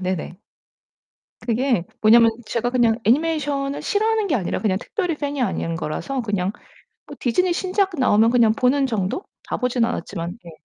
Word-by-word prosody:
네네. 180 -2 -3 1.1
그게 240 -5 0 0.2
뭐냐면 230 +1 +6 0.2
제가 235 +2 -1
그냥 240 -3 +3
애니메이션을 285 +1 0
싫어하는 435 0 +1
게 345 - 0
아니라 200 -9 -1
그냥 195 -4 +1
특별히 360 -6 -2
fan이 285 -2 -3
아닌 175 -6 -1
거라서 255 - -3
그냥 200 -4 -1 0.5
뭐 - - -10
디즈니 350 +9 +1
신작 380 +2 0
나오면 225 -4 +4
그냥 235 -3 +4
보는 270 +3 +2
정도? 220 - -2 0.2
다 - - -4
보진 250 -2 +1
않았지만. 175 -4 -4
네. 170 - -11
245 Hz, 360 characters per minute, -22 LUFS, 215-285 Hz, 1.1 s, 뭐냐면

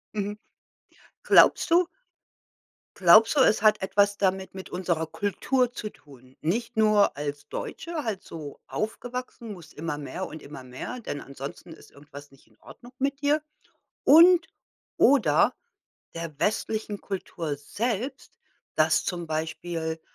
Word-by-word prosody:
Mhm. 205 0 -3 0.9
Glaubst - - +5
du 350 +1 +5 1.1
glaubst 205 - +7
du, 280 - +5
es 215 -5 +4
hat 215 -2 +4
etwas 200 +1 +2
damit 190 -1 -1
mit 190 - -8
unserer 170 -3 -1
Kultur 240 - 0
zu 215 -3 -5
tun? 130 -6 -19
Nicht 225 +8 -2
nur 215 -7 +4
als 145 0 -5
Deutsche 330 -4 -5
halt 205 -4 -3
so 155 -3 -9
aufgewachsen, 240 +1 -5
musst 175 -6 -11
immer 155 -1 -4
mehr 150 +6 -5
und 155 - -10
immer 140 -2 -10
mehr, 130 - -7
denn 145 - -5
ansonsten 140 +5 -9
ist - - -17
irgendwas 145 0 -13
nicht 135 - -22
in - - -27
Ordnung 245 +1 -14
mit 275 +2 -1
dir 295 +2 +2 0.6
und 335 +2 +7 0.5
oder 280 0 +4 0.6
der 165 -3 -6
westlichen 215 0 -1
Kultur 170 -5 -4
selbst, 230 - -4 0.4
dass 155 0 +3
zum 175 -2 -4
Beispiel 160 +1 -3
190 Hz, 135 wpm, -26 LUFS, 155-235 Hz, 1.1 s, glaubst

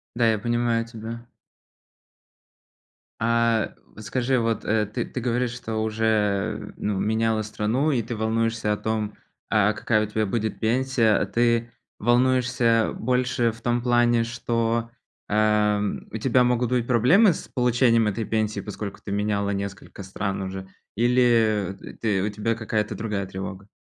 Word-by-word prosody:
Да, 115 -2 +3
я 110 - -1
понимаю 120 0 0
тебя. 115 +1 -8 1.9
А, 115 -1 +1 0.2
скажи 125 +3 0
вот, 115 -1 -1
э, 105 -1 +1
ты 105 - -3
ты 125 - -5
говоришь, 120 0 0
что 115 -2 -5
уже, 110 -2 0
ну, 105 -2 -2
меняла 110 +1 +1
страну, 110 +8 0
и 125 -4 +1
ты 120 +2 -5
волнуешься 110 0 0
о - - 0
том, 110 -1 -2 0.4
а 105 -1 +3
какая 110 +1 +1
у - - -3
тебя 110 0 0
будет 110 +2 -2
пенсия. 120 -1 +2
А - - 0
ты 120 0 +1 0.3
волнуешься 120 -1 +2
больше 125 -1 +1
в 115 +1 -11
том 120 0 0
плане, 120 -1 +3
что, 115 0 -1 0.4
ам, 105 -1 +1
у - - -3
тебя 125 +1 +3
могут 125 0 +1
быть 125 -2 +1
проблемы 165 - +5
с - - -7
получением 120 -2 +3
этой 105 +2 -1
пенсии, 110 -2 -1
поскольку 100 0 -7
ты 100 - -6
меняла 100 0 0
несколько 100 0 -5
стран 95 0 -3
уже, 95 0 -6 0.3
или, 115 -5 +2
э, - - -10
ты 100 -4 +1
у 105 - 0
тебя 105 +2 -1
какая-то 110 -1 -2
другая 105 -3 -3
тревога? 95 +1 -7
115 Hz, 150 wpm, -24 LUFS, 105-120 Hz, 1.9 s, проблемы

